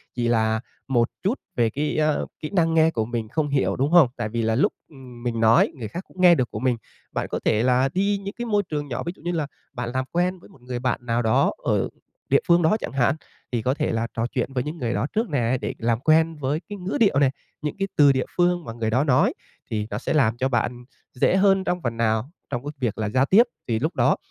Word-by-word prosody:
chỉ 120 Hz, -1 st, 0 dB
là 110 Hz, -1 st, +2 dB, 0.3 s
một 120 Hz, -3 st, +2 dB
chút 210 Hz, +8 st, 0 dB, 0.2 s
về 115 Hz, -5 st, +2 dB
cái, 145 Hz, +6 st, -2 dB
a, 155 Hz, -1 st, +2 dB, 0.2 s
kỹ 155 Hz, -, -5 dB
năng 165 Hz, -4 st, +2 dB
nghe 160 Hz, 0 st, +4 dB
của 110 Hz, -7 st, -1 dB
mình 115 Hz, -1 st, -3 dB
không 155 Hz, +3 st, 0 dB
hiểu, 140 Hz, -1 st, +1 dB
đúng 140 Hz, +4 st, 0 dB
không? 175 Hz, -6 st, +7 dB
Tại 120 Hz, -3 st, -2 dB
vì 115 Hz, +2 st, -2 dB
là 110 Hz, 0 st, +1 dB
lúc 130 Hz, -, +2 dB, 0.5 s
mình 120 Hz, -2 st, -2 dB
nói 115 Hz, +1 st, +5 dB
người 120 Hz, -6 st, -6 dB
khác 175 Hz, -, -6 dB
cũng 185 Hz, -, -8 dB
nghe 175 Hz, -1 st, +8 dB
được 130 Hz, -5 st, 0 dB
của -, -, -4 dB
mình. 125 Hz, -2 st, +1 dB, 0.3 s
Bạn -, -, -2 dB
có -, -, -1 dB
thể 110 Hz, -, +3 dB
là 130 Hz, +1 st, +3 dB
đi 200 Hz, +2 st, +1 dB
những 200 Hz, +1 st, -5 dB
cái 240 Hz, -, -3 dB
môi 205 Hz, -3 st, +1 dB
trường 150 Hz, -4 st, -4 dB
nhỏ 120 Hz, -3 st, -4 dB
ví 170 Hz, -, -2 dB
dụ -, -, -20 dB
như 175 Hz, +2 st, -2 dB
là 160 Hz, -4 st, -1 dB, 0.3 s
bạn 120 Hz, -2 st, -4 dB
làm 130 Hz, 0 st, -1 dB
quen 180 Hz, +2 st, 0 dB
một -, -, -20 dB
người 125 Hz, 0 st, -5 dB
bạn 125 Hz, -1 st, 0 dB
nào 115 Hz, 0 st, +1 dB
đó 110 Hz, -2 st, +3 dB
ở -, -, +1 dB, 0.4 s
địa 140 Hz, -, +5 dB
phương 170 Hz, -1 st, +5 dB
đó 165 Hz, +6 st, +3 dB
chẳng -, -, -5 dB
hạn, 125 Hz, -1 st, +2 dB, 0.4 s
thì 120 Hz, -2 st, 0 dB
có 125 Hz, +4 st, +1 dB
thể 145 Hz, -, -1 dB
là 115 Hz, +1 st, -1 dB
trò 115 Hz, -, -1 dB
chuyện 130 Hz, +1 st, -2 dB
với 125 Hz, -2 st, 0 dB
những 150 Hz, +4 st, -5 dB
người 120 Hz, -6 st, -2 dB
đó 135 Hz, -, -1 dB
trước 225 Hz, +1 st, 0 dB
nè, 130 Hz, -4 st, +1 dB
để -, -, -3 dB
làm 115 Hz, 0 st, 0 dB
quen 160 Hz, +3 st, +3 dB
với 145 Hz, +1 st, -1 dB
cái 205 Hz, -, -5 dB
ngữ 185 Hz, +1 st, -3 dB
điệu 200 Hz, -, +4 dB
nè, 140 Hz, -2 st, +4 dB, 0.3 s
những 150 Hz, -1 st, -3 dB
cái 195 Hz, -, 0 dB
từ 145 Hz, -2 st, +6 dB
địa 130 Hz, -1 st, 0 dB
phương 175 Hz, -1 st, +2 dB
mà 115 Hz, -, -6 dB
người 115 Hz, -1 st, -2 dB
đó 125 Hz, +5 st, +2 dB
nói, 135 Hz, -4 st, +3 dB, 0.4 s
thì 105 Hz, -1 st, -1 dB
nó 105 Hz, -, -3 dB
sẽ 120 Hz, -, -2 dB
làm 120 Hz, -7 st, +3 dB
cho 130 Hz, +2 st, 0 dB
bạn 120 Hz, 0 st, -1 dB, 0.3 s
dễ 130 Hz, -, +2 dB
hơn 195 Hz, 0 st, +4 dB
trong 180 Hz, -1 st, -1 dB
phần 115 Hz, -1 st, -3 dB
nào 110 Hz, +2 st, +1 dB, 0.2 s
trong 120 Hz, +1 st, -3 dB
cái 145 Hz, -, -3 dB
việc 120 Hz, -6 st, -1 dB
là 110 Hz, -1 st, -1 dB
giao 130 Hz, +5 st, +2 dB
tiếp, 200 Hz, +10 st, +6 dB, 0.2 s
thì 115 Hz, -3 st, 0 dB
lúc 155 Hz, +7 st, -2 dB
đó -, -, +3 dB
130 Hz, 260 wpm, -24 LUFS, 120-165 Hz, 0.5 s, nghe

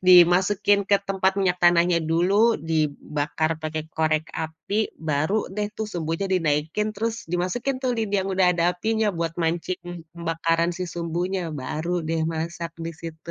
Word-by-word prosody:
dimasukin 185 Hz, +3 st, +6 dB
ke 200 Hz, -, +6 dB
tempat 190 Hz, 0 st, +2 dB
minyak 180 Hz, -2 st, +1 dB
tanahnya 175 Hz, 0 st, +5 dB
dulu, 200 Hz, +8 st, +4 dB
dibakar 150 Hz, 0 st, -1 dB
pakai 155 Hz, 0 st, -3 dB
korek 155 Hz, 0 st, 0 dB
api, 160 Hz, +7 st, -3 dB
baru 160 Hz, +7 st, -1 dB
deh 210 Hz, 0 st, -1 dB
tuh 220 Hz, -, -2 dB
sumbunya 165 Hz, +2 st, -2 dB
dinaikin 165 Hz, +5 st, 0 dB
terus 225 Hz, 0 st, -3 dB
dimasukin 185 Hz, +10 st, -1 dB
tuh 255 Hz, -, +1 dB
lidi 215 Hz, -2 st, -1 dB
yang 195 Hz, -, -3 dB
udah 185 Hz, -1 st, +3 dB
ada 170 Hz, -, 0 dB
apinya, 220 Hz, +4 st, 0 dB
buat 165 Hz, -1 st, -1 dB
mancing 175 Hz, 0 st, -3 dB
pembakaran 165 Hz, 0 st, 0 dB
si 180 Hz, +1 st, -4 dB
sumbunya, 175 Hz, +1 st, -2 dB
baru 155 Hz, +6 st, -3 dB, 0.2 s
deh 165 Hz, -1 st, 0 dB
masak 170 Hz, +1 st, -4 dB
di 165 Hz, 0 st, -4 dB
situ. 165 Hz, +1 st, -9 dB
175 Hz, 150 wpm, -24 LUFS, 160-195 Hz, 0.2 s, dimasukin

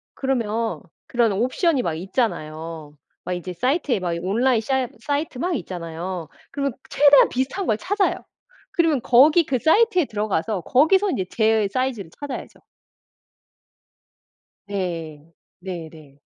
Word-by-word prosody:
그러면 230 Hz, -4 st, -1 dB, 0.3 s
그런 235 Hz, -3 st, +2 dB
옵션이 255 Hz, -, +1 dB
막 165 Hz, -, -1 dB
있잖아요. 160 Hz, -, -3 dB, 0.3 s
막 180 Hz, -, -2 dB
이제 180 Hz, +1 st, -5 dB
사이트에 255 Hz, -, 0 dB
막 175 Hz, -2 st, -2 dB
온라인 230 Hz, +7 st, +2 dB
샤 260 Hz, +2 st, 0 dB
사이트 285 Hz, -1 st, -2 dB
막 350 Hz, +6 st, -1 dB
있잖아요. 175 Hz, -, -5 dB, 0.2 s
그러면 280 Hz, -2 st, -2 dB, 0.2 s
최대한 285 Hz, -1 st, +6 dB
비슷한 265 Hz, +10 st, -2 dB
걸 215 Hz, -, +2 dB
찾아요. 400 Hz, -, 0 dB, 0.6 s
그러면 320 Hz, -6 st, +2 dB
거기 300 Hz, +7 st, +6 dB
그 260 Hz, -3 st, 0 dB
사이트에 365 Hz, -, +4 dB
들어 215 Hz, -3 st, -3 dB
가서 200 Hz, +1 st, -1 dB
거기서 375 Hz, -, +3 dB
인제 190 Hz, -, -1 dB
제 220 Hz, -2 st, +2 dB
사이즈를 255 Hz, -8 st, -2 dB
찾아야죠. 285 Hz, -2 st, -7 dB, 2.1 s
네. 165 Hz, -5 st, -5 dB, 0.3 s
네네. 160 Hz, -6 st, -9 dB
230 Hz, 285 characters per minute, -23 LUFS, 180-280 Hz, 2.1 s, 최대한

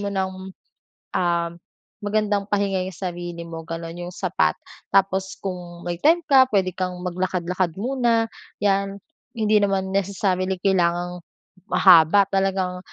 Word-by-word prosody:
mo 205 Hz, -, -3 dB
ng, 190 Hz, -1 st, -1 dB, 0.9 s
um, 170 Hz, -1 st, +1 dB, 0.5 s
magandang 205 Hz, -1 st, 0 dB
pahinga 200 Hz, -2 st, +1 dB
'yong 190 Hz, -, -7 dB
sarili 175 Hz, -2 st, -5 dB
mo 165 Hz, -1 st, -7 dB
gano'n 165 Hz, +1 st, -6 dB
'yong 175 Hz, 0 st, -7 dB
sapat. -, -, +1 dB, 0.4 s
Tapos 190 Hz, 0 st, +2 dB
kung 175 Hz, -2 st, -6 dB
may 175 Hz, -1 st, -3 dB
time 335 Hz, +3 st, +4 dB
ka 265 Hz, -2 st, +6 dB
puwede 190 Hz, -3 st, +2 dB
kang 185 Hz, -1 st, -2 dB
maglakad-lakad 180 Hz, -1 st, -1 dB
muna, 235 Hz, -1 st, +1 dB, 0.4 s
'yan. 200 Hz, 0 st, +1 dB, 0.3 s
Hindi 215 Hz, -1 st, +3 dB
naman 195 Hz, -1 st, 0 dB
necessarily 190 Hz, -1 st, 0 dB
kailangang, 175 Hz, -2 st, +1 dB, 0.5 s
mahaba 180 Hz, +1 st, +7 dB
talagang 190 Hz, -1 st, 0 dB
190 Hz, 125 wpm, -23 LUFS, 175-200 Hz, 0.9 s, mahaba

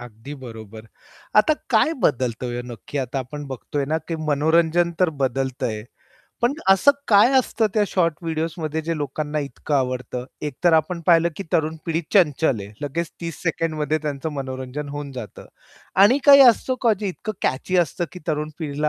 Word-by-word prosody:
अगदी 120 Hz, +4 st, -10 dB
बरोबर. 115 Hz, -4 st, -10 dB, 0.5 s
आता 215 Hz, +9 st, +5 dB, 0.2 s
काय 240 Hz, +7 st, +4 dB
बदलतंय 120 Hz, -2 st, 0 dB
ओ, -, -, -4 dB
नक्की 130 Hz, +5 st, -6 dB
आता 130 Hz, 0 st, -2 dB
आपण 145 Hz, +3 st, -6 dB
बघतोय 140 Hz, +2 st, -4 dB
ना, 160 Hz, +1 st, +1 dB
की 165 Hz, 0 st, -5 dB
मनोरंजन 160 Hz, +3 st, +3 dB
तर 180 Hz, -, +4 dB
बदलतंय 130 Hz, -4 st, -2 dB, 0.6 s
पण 240 Hz, +4 st, +3 dB
असं 195 Hz, +9 st, +6 dB, 0.2 s
काय 210 Hz, +4 st, +6 dB
असतं 230 Hz, -3 st, +1 dB
त्या 215 Hz, -, +3 dB
शॉर्ट 170 Hz, -4 st, +1 dB
व्हिडिओजमध्ये 160 Hz, -1 st, -2 dB
जे 165 Hz, +1 st, -2 dB
लोकांना 150 Hz, +1 st, -3 dB
इतकं 145 Hz, +1 st, -4 dB
आवडतं? 125 Hz, -2 st, -1 dB, 0.2 s
एकतर 150 Hz, +4 st, +1 dB
आपण 160 Hz, +2 st, +2 dB
पाहिलं, 170 Hz, -1 st, +5 dB
की -, -, -4 dB
तरुण 160 Hz, 0 st, +1 dB
पिढी 165 Hz, 0 st, 0 dB
चंचल 150 Hz, -, +3 dB
आहे. 100 Hz, +1 st, -9 dB
लगेच 155 Hz, +4 st, -3 dB
30 165 Hz, -1 st, -6 dB
सेकंडमध्ये 155 Hz, -2 st, -1 dB
त्यांचं 150 Hz, +1 st, -3 dB
मनोरंजन 130 Hz, +1 st, -5 dB
होऊन 145 Hz, -1 st, -6 dB
जातं 125 Hz, -5 st, -9 dB, 0.6 s
आणि 245 Hz, +7 st, +5 dB
काही 280 Hz, -1 st, +10 dB
असतं 255 Hz, +3 st, -2 dB
का 235 Hz, -3 st, +5 dB
जे 205 Hz, -, -1 dB
इतकं 205 Hz, +3 st, -5 dB
कॅची 165 Hz, +8 st, 0 dB
असतं, 175 Hz, 0 st, +1 dB
की 180 Hz, -, -9 dB
तरुण 150 Hz, 0 st, -1 dB
पिढीला 150 Hz, -2 st, -1 dB
150 Hz, 165 wpm, -22 LUFS, 130-170 Hz, 0.6 s, काही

